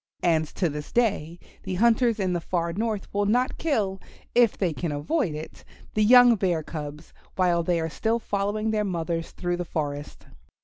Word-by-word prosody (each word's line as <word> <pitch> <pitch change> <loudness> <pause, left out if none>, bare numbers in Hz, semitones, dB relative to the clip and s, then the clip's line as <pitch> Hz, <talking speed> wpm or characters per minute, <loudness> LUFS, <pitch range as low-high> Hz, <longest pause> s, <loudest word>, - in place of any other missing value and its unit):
And 160 -3 +2
to 180 - +1
this 150 -1 -6
day 195 -9 0 0.2
the 190 -1 -4
hunters 230 +2 +3
in 185 -2 0
the 175 - -1
far 170 0 -2
north 215 0 -2
will 205 0 +1
not 245 +4 +1
kill, 210 - 0 0.3
if 240 -3 +4
they 180 -5 0
can 165 +1 -3
avoid 155 - -1
it, 155 +1 -9 0.3
the 215 - +1
young 245 +1 +8
Bear 175 -5 0
cubs 150 0 -7 0.2
while 175 -2 +2
they 170 0 0
are 160 - -1
still 225 +8 0
following 210 0 -1
their 215 -1 +1
mothers 170 -3 -2
through 175 -1 -3
the 175 - -2
forest. 145 -3 -5
185 Hz, 180 wpm, -25 LUFS, 165-215 Hz, 0.3 s, young